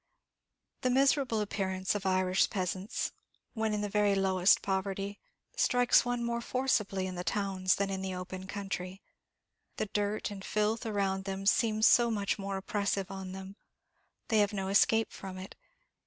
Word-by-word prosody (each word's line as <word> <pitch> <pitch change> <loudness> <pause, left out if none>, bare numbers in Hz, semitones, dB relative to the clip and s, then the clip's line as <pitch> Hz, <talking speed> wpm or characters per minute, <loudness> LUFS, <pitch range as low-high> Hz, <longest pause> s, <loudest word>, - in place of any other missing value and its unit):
The 255 - +1
miserable 265 -3 +3
appearance 190 -2 -1
of 205 -2 -2
Irish 185 0 +2
peasants, 185 0 -2 0.4
when 220 -2 -1
in 210 -1 -1
the 205 - -1
very 205 -1 +2
lowest 190 0 +3
poverty, 195 +1 -2 0.4
strikes 245 -1 +4
one 245 -1 -2
more 235 0 -1
forcibly 215 -7 0
in 185 - -4
the 180 0 -4
towns 185 0 +1
than 195 0 -1
in 190 0 -3
the 190 -1 -3
open 185 +1 -6
country. 195 -2 -5 0.7
The - - -1
dirt 205 0 -1
and 195 -1 -8
filth 215 +3 0
around 195 -2 -1
them 195 0 -4
seems 215 +1 +3
so 235 0 +6
much 205 -2 -1
more 195 0 -3
oppressive 200 0 -2
on 190 -1 -6
them; 190 +1 -9 0.7
they 220 - +3
have 205 0 +2
no 195 -1 -2
escape 225 +3 +3
from 190 -2 -8
it. 185 +1 -8
200 Hz, 160 wpm, -31 LUFS, 190-215 Hz, 0.7 s, so